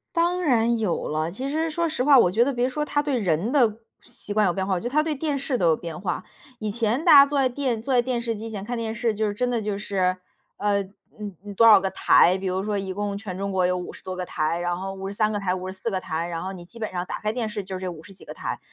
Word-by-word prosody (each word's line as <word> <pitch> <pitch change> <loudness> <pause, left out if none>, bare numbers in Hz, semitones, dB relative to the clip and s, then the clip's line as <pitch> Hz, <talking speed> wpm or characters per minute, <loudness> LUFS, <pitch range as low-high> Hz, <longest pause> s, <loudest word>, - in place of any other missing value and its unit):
当 350 +2 +1
然 235 -5 +3
有 210 -6 -1
了， 155 +2 -1
其 260 +9 -4
实 320 +2 0
说 335 +1 0
实 305 -5 -1
话， 280 -1 +7
我 180 - +5
觉 225 +5 +4
得 280 - 0
别 245 +1 +1
说 300 +3 -2
它 290 -1 +1
对 290 -3 -1
人 190 +1 0
的 240 -7 +3 0.3
习 235 -3 -10
惯 210 0 +3
有 180 - +2
变 190 +1 -2
化， 190 - +1
我 - - -1
觉 - - -11
得 240 - -3
它 305 +3 +3
对 310 -1 -2
电 290 0 -2
视 270 -1 -1
都 175 -5 +3
有 160 - +4
变 165 -1 -7
化。 180 -3 -2 0.4
以 215 - -3
前 230 +5 0
大 335 - +5
家 280 -1 +10
坐 285 0 -1
在 260 -1 +3
电 250 -3 -2
坐 260 +3 0
在 - - +5
电 240 -1 -2
视 230 -1 -2
机 220 +2 -6
前 200 -3 -5
看 240 +3 -4
电 225 -1 -3
视， 230 -1 -1
就 215 +1 0
是 205 - -2
真 245 +4 -1
的 240 -2 0
就 205 -2 -3
是， 190 -3 0 0.4
呃， 205 -1 +1
嗯， 200 +1 -11
嗯， 205 -1 -8
多 230 +3 +6
少 215 -3 +8
个 190 - 0
台， 185 -1 +4
比 190 - -7
如 185 +1 -1
说 210 0 -1
一 195 -1 -3
共 205 0 -3
全 200 -3 -6
中 200 0 -2
国 185 -1 +2
有 180 0 +1
50 180 0 -7
多 185 0 -5
个 185 - -3
台， 165 -1 -1
然 175 0 -1
后 195 +1 -4
53 200 +3 -1
个 205 - -1
台， 185 -2 0
54 185 +4 -4
个 190 -4 -1
台， 165 -1 -3
然 165 -1 -4
后 190 +1 -4
你 180 -2 -9
基 180 +7 -16
本 220 -2 -4
上 180 -1 -2
打 - - -4
开 215 - -1
电 230 -2 -2
视 210 -1 -4
就 190 -1 -6
这 185 -1 -3
50 170 +3 -10
几 190 - -15
个 - - -9
台。 - - -4
210 Hz, 310 characters per minute, -24 LUFS, 185-245 Hz, 0.4 s, 家